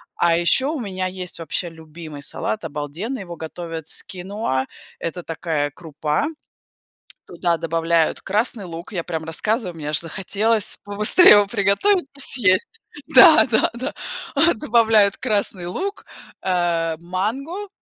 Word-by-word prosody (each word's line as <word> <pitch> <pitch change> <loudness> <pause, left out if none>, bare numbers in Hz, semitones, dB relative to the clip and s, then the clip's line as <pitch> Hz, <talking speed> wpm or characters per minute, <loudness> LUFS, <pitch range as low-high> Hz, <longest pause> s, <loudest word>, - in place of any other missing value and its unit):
А 170 -1 +3
еще 175 +10 +3
у 305 0 -2
меня 190 -5 -3
есть 180 -1 -5
вообще 165 +2 -3
любимый 160 -2 -11
салат 215 +8 -3
обалденный, 165 - -5
его 175 -2 -8
готовят 165 0 -7
с - - 0
киноа- 185 -8 -3 0.3
это 175 +1 -5
такая 160 -3 -2
крупа. 155 - -2 1.0
Туда 170 -2 -1
добавляют 165 0 0
красный 215 +1 -1
лук, 170 +2 -8
я 180 -4 -2
прям 160 -2 -4
рассказываю, 185 +4 -2
мне 150 -2 -6
aж 150 - +2
захотелось 205 +5 -1
побыстрее 210 - +6
его 205 -1 +6
приготовить 220 - +2
и - - -6
съесть! 235 - +1 0.3
Да-да-да! 260 - +5 0.4
А, 325 +4 +5
добавляют 220 -3 +3
красный 200 -6 -1
лук, 390 - -4 0.4
э, 170 -3 0
манго 235 - -4
185 Hz, 130 wpm, -21 LUFS, 165-220 Hz, 1.0 s, побыстрее